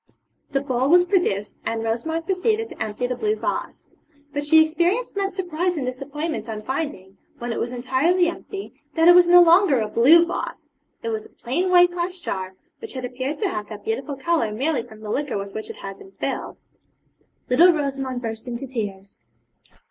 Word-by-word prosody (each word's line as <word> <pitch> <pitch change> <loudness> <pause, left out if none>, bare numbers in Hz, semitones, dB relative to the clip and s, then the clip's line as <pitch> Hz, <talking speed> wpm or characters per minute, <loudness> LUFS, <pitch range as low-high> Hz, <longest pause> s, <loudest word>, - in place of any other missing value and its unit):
The 275 -1 0
bowl 260 -1 0
was 355 +2 +7
produced, 350 - 0
and 225 0 -2
Rosamond 320 +9 -2
proceeded 430 +4 0
to - - -11
empty 220 +3 -3
the 250 0 -2
blue 425 - 0
vase. - - -4 0.5
But 290 0 -2
she 315 +2 +6
experienced 350 +11 0
much 395 -1 -1
surprise 355 -1 -1
and 275 - -2
disappointment 275 0 -4
on 215 -1 -5
finding, 260 -9 -4 0.2
when 240 0 -4
it - - -3
was 240 - -2
entirely 265 +9 +2
empty, 390 +2 -6 0.2
that 325 +1 +4
it 350 - +10
was 355 0 +7
no 355 0 +8
longer 340 -5 +5
a 215 - -1
blue 300 +11 +6
vase. 320 -3 -5 0.3
It 230 - -2
was 220 -1 -4
a - - -30
plain 330 +10 -2
white 355 -1 +6
glass 355 +1 -3
jar, 190 - -4 0.2
which 450 - -7
had 260 -2 -4
appeared 260 +4 -4
to 395 - +2
have 210 - -4
that 210 -2 -9
beautiful 270 +5 -3
colour 310 -6 0
merely 265 +5 0
from 220 -1 -14
the 210 -1 -5
liquor 280 -3 -1
with 200 0 -6
which 220 - -6
it - - -7
had 195 0 -8
been 385 -1 -14
filled. - - -4 0.9
Little 335 +9 +6
Rosamond 270 -5 -3
burst 225 +1 -5
into 245 +2 -4
tears. 200 - -6
280 Hz, 195 wpm, -23 LUFS, 230-345 Hz, 0.9 s, it